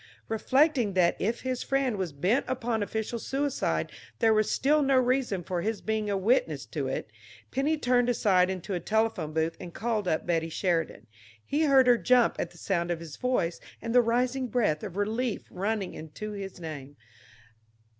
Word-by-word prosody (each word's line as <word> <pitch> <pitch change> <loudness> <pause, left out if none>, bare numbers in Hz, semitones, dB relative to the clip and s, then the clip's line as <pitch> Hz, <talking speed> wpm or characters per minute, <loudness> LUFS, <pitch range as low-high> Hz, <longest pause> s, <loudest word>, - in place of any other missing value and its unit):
Reflecting 255 0 +2
that 175 -2 +4
if 225 +4 -1
his 255 -1 -2
friend 270 -4 0
was 190 -4 -3
bent 180 - +1
upon 240 -3 -1
official 220 +3 -3
suicide, 275 +4 -1 0.3
there 225 -2 +4
was 215 -1 +2
still 295 +3 +3
no 270 -1 +3
reason 250 -7 +1
for 175 0 -2
his 220 +3 -2
being, 220 -1 -2
a 200 - +1
witness 235 - +1
to - - -3
it, - - -4 0.4
Penny 290 +4 +1
turned 245 -3 +2
aside 190 -6 +3
into 190 +1 -4
a 180 - -1
telephone 220 -6 0
booth 160 +1 0
and 175 -2 -9
called 220 -3 -1
up 160 -2 0
Betty 165 -1 0
Sheridan. 165 - -1 0.4
He 305 +3 +1
heard 270 -3 +6
her 245 -1 +5
jump 245 +6 +3
at 170 - -2
the 175 - -18
sound 170 -1 -1
of 170 -1 -1
his 165 -3 -9
voice, 250 -10 -1 0.2
and 230 0 -4
the 245 - +7
rising 250 +3 0
breath 210 -10 +1
of 195 -3 -7
relief 220 +3 -1
running 200 +1 -2
into 160 +7 -7
his 195 -3 -7
name. 145 -4 -8
220 Hz, 180 wpm, -28 LUFS, 180-250 Hz, 0.4 s, the